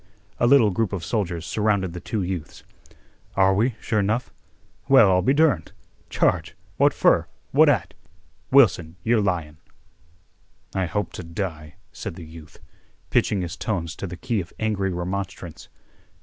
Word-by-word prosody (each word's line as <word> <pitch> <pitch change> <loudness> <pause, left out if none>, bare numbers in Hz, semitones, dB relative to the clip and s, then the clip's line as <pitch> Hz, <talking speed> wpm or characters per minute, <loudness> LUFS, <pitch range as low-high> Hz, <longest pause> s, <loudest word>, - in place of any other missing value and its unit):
A 120 - +3
little 120 -5 +5
group 105 +1 -1
of 90 -4 -4
soldiers 90 -7 -2
surrounded 100 -2 0
the 90 - -6
two 105 +2 -3
youths. 90 -5 -5 0.7
"Are 95 0 +4
we, 115 +4 +1
sure 110 -3 0
'nough? 110 +6 -1 0.6
Well, 115 -8 +7
I'll 90 0 +3
be 115 - +2
derned! 140 - +2 0.4
Charge? - - 0 0.2
What - - +5
fer? - - +3 0.2
What - - +6
at? - - 0 0.6
Wilson, 95 - +4
you're 115 -1 +3
lyin'." 85 -6 -2 1.2
"I 95 -2 0
hope 105 +1 -3
to - - -7
die," 80 -2 -5 0.2
said - - -6
the 85 - -9
youth, 80 -1 -13 0.5
pitching 100 - +2
his 85 -1 -5
tones 85 -6 -3
to 100 - -5
the 90 0 -8
key 120 -1 -1
of 85 - -11
angry 100 -3 -1
remonstrance. 90 -1 -5
95 Hz, 150 wpm, -23 LUFS, 85-110 Hz, 1.2 s, Well